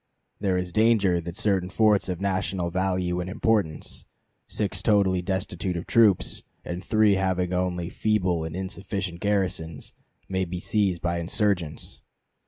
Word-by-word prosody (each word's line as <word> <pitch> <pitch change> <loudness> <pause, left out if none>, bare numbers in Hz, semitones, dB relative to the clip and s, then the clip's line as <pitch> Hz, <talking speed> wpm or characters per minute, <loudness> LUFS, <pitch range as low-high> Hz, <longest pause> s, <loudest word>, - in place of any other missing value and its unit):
There 95 -2 +1
is 90 -1 -3
danger 105 -6 +3
that 85 +2 -7
certain 95 -4 +1
forts 105 -1 +3
of 90 -2 -2
national 95 -2 -1
value 90 -1 0
and 90 +1 -3
importance, 105 -5 -1 0.4
six 100 -3 -2
totally 95 -3 +3
destitute 90 -1 -2
of 85 - -5
troops, 110 -6 +3 0.2
and 85 +1 -5
three 110 0 +4
having 95 -1 0
only 90 -1 -1
feeble 95 -5 0
and 80 +1 -5
insufficient 95 -1 -4
garrisons, 90 -7 -1 0.3
may 95 -1 0
be 90 0 -4
seized 95 -3 0
by 85 0 0
insurgents. 90 -3 -1
95 Hz, 140 wpm, -26 LUFS, 90-100 Hz, 0.4 s, three